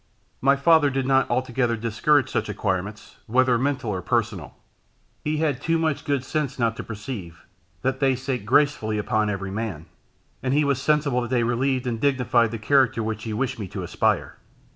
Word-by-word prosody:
My 140 +2 +4
father 150 +1 +4
did 135 -1 -1
not 135 0 +3
altogether 120 -1 0
discourage 120 +5 +2
such 130 - -2
acquirements, 105 0 -3
whether 130 +2 +3
mental 130 -4 -1
or 95 -2 -3
personal. 110 -6 -2 0.7
He 150 +1 -1
had 150 -4 0
too 165 +2 +1
much 160 -3 -1
good 140 -3 0
sense 145 -1 -2
not 115 -2 +1
to - - -5
perceive, 105 -6 -7 0.4
that 130 0 0
they 135 -2 +3
sate 130 -2 -3
gracefully 110 -3 +2
upon 105 0 0
every 95 -1 -3
man, 100 -7 -4 0.6
and 130 +1 0
he 150 0 +3
was 140 -2 0
sensible 145 -3 +2
that 120 - -4
they 125 -2 +2
relieved 125 +2 0
and 115 -2 -3
dignified 125 -4 +2
the 115 - -5
character 130 +3 +3
to 115 - -2
which 110 0 -4
he 110 - -3
wished 125 +1 -2
me 100 - -4
to - - -6
aspire. - - 0
125 Hz, 185 wpm, -24 LUFS, 110-140 Hz, 0.7 s, My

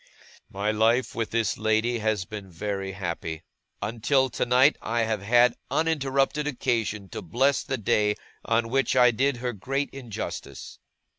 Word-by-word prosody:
'My 100 +2 -1
life 115 +4 +2
with 115 -1 -2
this 115 -3 0
lady 110 +2 +1
has 110 -3 0
been 100 -2 -8
very 95 +2 -4
happy. 85 -3 -4 0.4
Until 130 +4 +1
tonight, 125 +5 +4
I 115 +1 -1
have 110 -3 -1
had 120 +3 +4 0.2
uninterrupted 150 -2 +1
occasion 115 -7 -1
to - - -6
bless 130 - +1
the 130 -1 -3
day 105 -1 +2 0.3
on 115 0 +1
which 135 +2 +1
I 125 -1 +6
did 135 +3 +1
her 125 0 -3
great 135 +7 -2
injustice. 125 -6 -7
115 Hz, 145 wpm, -26 LUFS, 105-130 Hz, 0.4 s, I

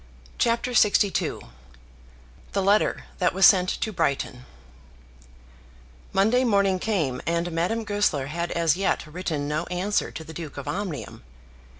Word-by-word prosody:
CHAPTER 235 +1 +1
LXII 210 -3 +2 1.1
The 195 - 0
Letter 205 +2 +2 0.2
That 180 -1 +1
Was 190 -1 +6
Sent 185 -1 +6
to 220 - -2
Brighton 135 -5 -2 1.6
Monday 220 +6 +3
morning 200 -5 +2
came 165 - -1
and 170 +1 0
Madame 175 +8 -1
Goesler 205 -10 0
had 170 +4 -3
as 165 -3 +2
yet 195 -2 0
written 155 -2 -4
no 155 +3 -2
answer 185 +3 -1
to 160 - -8
the 160 - -10
Duke 155 -3 -8
of 140 - -7
Omnium. 185 - -5
180 Hz, 130 wpm, -25 LUFS, 160-205 Hz, 1.6 s, Was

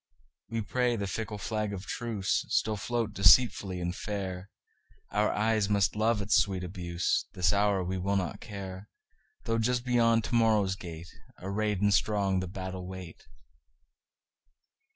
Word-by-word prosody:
We 115 0 -2
pray 125 +2 +1
the 100 -3 -2
fickle 105 +1 -4
flag 105 0 -2
of 95 0 -6
truceStill 110 -1 -1
float 115 0 -2
deceitfully 100 -1 +5
and 90 +1 -3
fair; 95 -2 -5 0.6
Our 105 +1 +2
eyes 110 -1 +1
must 100 -1 +2
love 110 0 +1
its 100 0 +3
sweet 95 -2 +1
abuse; 90 +4 -1
This 90 -1 +2
hour 100 -2 +2
we 95 +1 -3
will 100 +2 0
not 95 +1 -2
care, 100 -2 -8 0.5
Though 115 0 0
just 120 +2 0
beyond 115 -2 +3
to - - -5
morrow's 110 -5 +3
gate, 85 -2 -9 0.3
Arrayed 100 +1 -1
and 105 -1 +3
strong, 100 -2 +2
the 95 - -3
battle 95 0 -6
wait. 90 -3 -9
100 Hz, 145 wpm, -29 LUFS, 95-110 Hz, 0.6 s, deceitfully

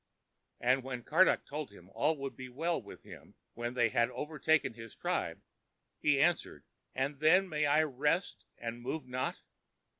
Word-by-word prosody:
And 130 +2 +3
when 125 -2 -5
Karduk 180 +9 +4
told 150 0 -5
him 90 -3 -15
all 150 +8 +1
would 135 -1 -4
he 130 -1 -8
well 165 +7 -1
with - - -12
him - - -13 0.2
when 120 +1 -4
they 120 -2 +3
had 115 +3 +2
overtaken 155 +1 +1
his 115 -1 -11
tribe, - - -2 0.6
he 145 -2 +3
asked, 170 +4 +3 0.5
"And 135 +2 -1
then 180 +6 +5
may 150 -3 +1
I 150 +2 +5
rest 150 +5 0
and 115 0 -5
move 155 +6 -3
not?" 130 0 -3
140 Hz, 160 wpm, -33 LUFS, 125-155 Hz, 0.6 s, then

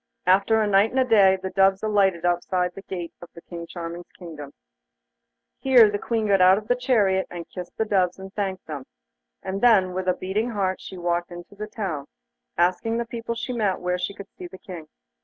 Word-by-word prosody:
After 195 +4 +4
a 215 - +2
night 200 +2 +4
and 265 - -1
a 260 - +4
day 200 -5 +5
the 190 0 -5
doves 195 0 +3
alighted 195 -5 +2
outside 180 +1 0
the 195 - -9
gate 175 -3 -6
of 175 - -11 0.2
King 170 -1 -7
Charming's 170 0 -7
kingdom. 155 -6 -9 1.1
Here 245 -5 +6
the 205 - -2
Queen 225 -1 -1
got 195 -2 +3
out 185 +1 +7
of 215 0 -6
the 245 - +3
chariot, 205 -7 +2
and 175 -1 -7
kissed 180 -2 -9
the 220 - +1
doves 185 -4 +1
and 190 0 -10
thanked 190 -3 -3
them, 145 -4 -7 0.6
and 195 +1 -4
then 195 -7 +5
with 185 0 -3
a 180 - +3
beating 210 +6 -1
heart 195 -4 -1
she 190 - -9
walked 175 0 -1
into 175 +2 -10
the 210 +1 -6
town, 180 -10 -4 0.5
asking 185 +6 +1
the 235 - -1
people 235 -1 -5
she 245 +2 -4
met 210 -5 0
where 180 0 -1
she 180 +3 -3
could 200 -1 -11
see 180 - -9
the 190 - -12
King. 180 -6 -9
190 Hz, 210 wpm, -24 LUFS, 180-215 Hz, 1.1 s, out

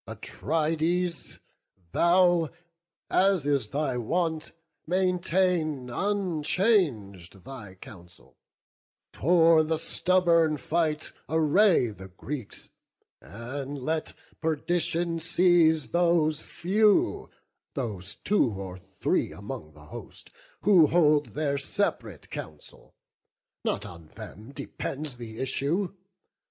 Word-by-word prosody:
Atrides, 165 +3 -2 0.5
thou, 175 - +4 0.6
as 190 -5 +3
is 140 -6 +1
thy 140 +1 -1
wont, 160 +5 -1 0.4
maintain 180 -6 +1
Unchang'd 155 - 0
thy 115 -8 -9
counsel; 90 -2 -14 0.8
for 165 0 +5
the 160 +1 0
stubborn 170 -2 +2
fight 155 +1 -1 0.2
Array 160 - +4
the 95 -2 -11
Greeks; 115 +6 -8 0.5
and 135 +5 -6
let 155 +4 -2 0.3
perdition 165 +1 0
seize 165 -2 +3
Those 170 -3 +2
few, 215 - +1 0.5
those 105 - -4
two 190 - +1
or 95 -1 -7
three 95 +1 -1
among 80 0 -8
the 75 0 -16
host, 80 - -10 0.3
Who 180 -6 +6
hold 150 -3 +3
their 145 -2 0
separate 120 - -3
counsel—(not 75 -1 -8
on 85 -2 -11
them 110 +7 -10
Depends 140 -1 -5
the 115 -2 -9
issue!) 150 - -1
155 Hz, 90 wpm, -27 LUFS, 125-175 Hz, 0.8 s, Who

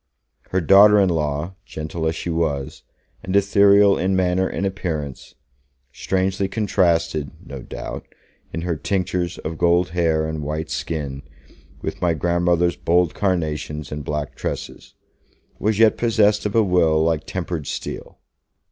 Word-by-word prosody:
Her 95 - 0
daughter 100 +4 +7
in 95 -2 +3
law, 75 +1 -2
gentle 80 -1 -4
as 80 - -1
she 85 - -4
was, 75 -5 -2 0.4
and 95 - -3
ethereal 100 0 +5
in 95 +1 +1
manner 95 0 +1
and 100 - -3
appearance 80 -8 -4 0.6
strangely 95 +1 -1
contrasted 85 - 0 0.2
(no - - -8
doubt), - - -7 0.4
in 85 - -4
her 85 -1 -1
tinctures 90 +2 -2
of 80 0 -6
gold 85 +1 +3
hair 80 -2 +1
and 80 -1 -4
white 75 +2 -4
skin, 70 -4 -4 0.6
with - - -5
my 85 -2 +2
grandmother's 85 +1 +1
bold 85 0 +1
carnations 75 -6 -2
and 75 0 -5
black 75 0 -3
tresses - - -6 0.6
was 105 0 0
yet 110 -1 +5
possessed 105 -3 +2
of 105 - -6
a 115 - +5
will 85 -5 +3
like 80 -1 0
tempered 85 -5 -4
steel. - - -6
85 Hz, 140 wpm, -21 LUFS, 80-95 Hz, 0.6 s, daughter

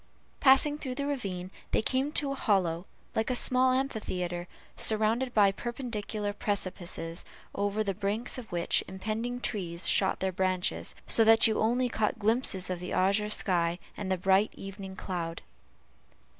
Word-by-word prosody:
Passing 290 +2 +5
through 260 -4 -4
the 280 +1 -2
ravine, 195 -10 -3 0.2
they - - +1
came 265 +4 +1
to 280 -2 +1
a - - 0
hollow, 185 -8 0 0.3
like 220 - 0
a 255 - +1
small 255 +1 +3
amphitheatre, 180 -9 -2 0.3
surrounded 220 +4 +1
by 205 -4 +5
perpendicular 215 -2 -4
precipices, 175 -5 -3 0.3
over 205 +2 0
the 200 -2 -1
brinks 210 +6 -1
of 235 - -11
which 175 -1 +1
impending 220 +6 -3
trees 175 -7 -2
shot 190 - +3
their 190 0 0
branches, 185 0 -1
so 225 - +5
that 225 0 +7
you 220 - +2
only 245 +3 +2
caught 220 -2 -1
glimpses 215 -4 +1
of 180 - -3
the 180 - -6
azure 200 +3 +2
sky, 175 -5 +1 0.2
and 195 -2 -4
the 185 - +2
bright 190 +3 +3
evening 195 -1 -8
cloud. 170 -4 -4
205 Hz, 155 wpm, -29 LUFS, 185-240 Hz, 0.3 s, that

